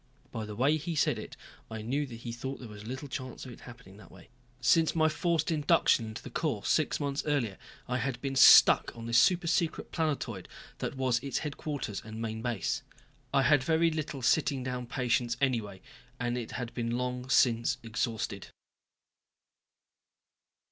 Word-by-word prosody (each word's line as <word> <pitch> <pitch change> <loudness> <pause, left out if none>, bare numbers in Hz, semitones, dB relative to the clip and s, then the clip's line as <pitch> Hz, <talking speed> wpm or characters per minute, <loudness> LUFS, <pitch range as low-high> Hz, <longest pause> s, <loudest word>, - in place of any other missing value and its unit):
By 110 - -4
the 105 -1 -7
way 140 +7 +3
he 165 +2 -4
said 150 - +1
it, - - -9 0.3
I 110 -1 -6
knew 140 +6 -1
he 115 -1 -7
thought 130 +4 -5
there 125 - -9
was 105 0 -10
little 130 +4 -5
chance 130 -1 -6
of 130 - -8
its - - -13
happening 120 -6 -13
that 105 - -15
way. - - -16 0.3
Since 160 +8 +3
my 160 -1 +4
forced 165 +1 0
induction 145 -6 +3
into 110 - -8
the - - -9
Corps - - -2
six - - +1
months 140 -1 -1
earlier 120 - 0 0.3
I 125 +1 -1
had 130 -3 -2
been 135 +1 -3
stuck 130 - +7
on 115 - -7
this 115 0 +4
super 175 +7 +3
secret 170 -1 0
planetoid 140 - -2 0.3
that - - -4
was 130 -2 +1
its 140 +1 -3
headquarters 145 -8 -4
and 110 0 -8
main 110 -1 -4
base. 120 -4 -2 0.5
I 140 -1 +3
had 145 0 +4
very 165 +3 +2
little 150 -4 -4
sitting 140 -1 +2
down 125 -1 -4
patience 120 -2 0
anyway, 115 -8 -1 0.4
and 120 0 -1
it 120 -2 -5
had 120 -2 -5
been 120 0 -2
long 125 0 -3
since 120 -3 +3
exhausted. 115 0 -3
125 Hz, 175 wpm, -30 LUFS, 115-145 Hz, 0.5 s, stuck